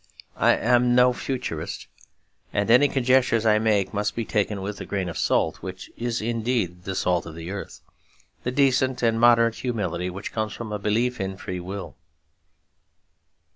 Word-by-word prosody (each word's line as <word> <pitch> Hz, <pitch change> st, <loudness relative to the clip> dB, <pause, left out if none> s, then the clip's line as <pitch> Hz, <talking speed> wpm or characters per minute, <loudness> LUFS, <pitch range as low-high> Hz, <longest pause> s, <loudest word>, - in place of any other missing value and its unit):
I -, -, +4 dB
am 120 Hz, +1 st, +3 dB
no 125 Hz, 0 st, +5 dB
Futurist; 120 Hz, -, -4 dB, 0.7 s
and 100 Hz, +2 st, 0 dB
any 125 Hz, +5 st, +7 dB
conjectures 130 Hz, -4 st, +2 dB
I 105 Hz, -1 st, +4 dB
make 105 Hz, -3 st, +1 dB
must 105 Hz, 0 st, -1 dB
be 115 Hz, -, -2 dB
taken 105 Hz, -2 st, -1 dB
with 100 Hz, 0 st, -4 dB
the -, -, -7 dB
grain 95 Hz, -2 st, -2 dB
of 85 Hz, -, -6 dB
salt -, -, +1 dB
which 95 Hz, 0 st, -8 dB
is 120 Hz, -1 st, -2 dB
indeed 110 Hz, -6 st, -1 dB
the 95 Hz, -, -3 dB
salt 90 Hz, -2 st, 0 dB
of 80 Hz, -, -9 dB
the 85 Hz, +2 st, -7 dB
earth; 100 Hz, 0 st, -7 dB, 0.6 s
the -, -, -2 dB
decent 130 Hz, -1 st, +2 dB
and 115 Hz, -1 st, +2 dB
moderate 115 Hz, -1 st, +5 dB
humility 90 Hz, -8 st, -2 dB
which 95 Hz, +3 st, -6 dB
comes 110 Hz, -1 st, -2 dB
from 115 Hz, -2 st, -7 dB
a 105 Hz, -, -3 dB
belief 115 Hz, +3 st, 0 dB
in 95 Hz, 0 st, -4 dB
free 90 Hz, -2 st, -5 dB
will. 90 Hz, -3 st, -7 dB
110 Hz, 170 wpm, -24 LUFS, 95-120 Hz, 0.7 s, any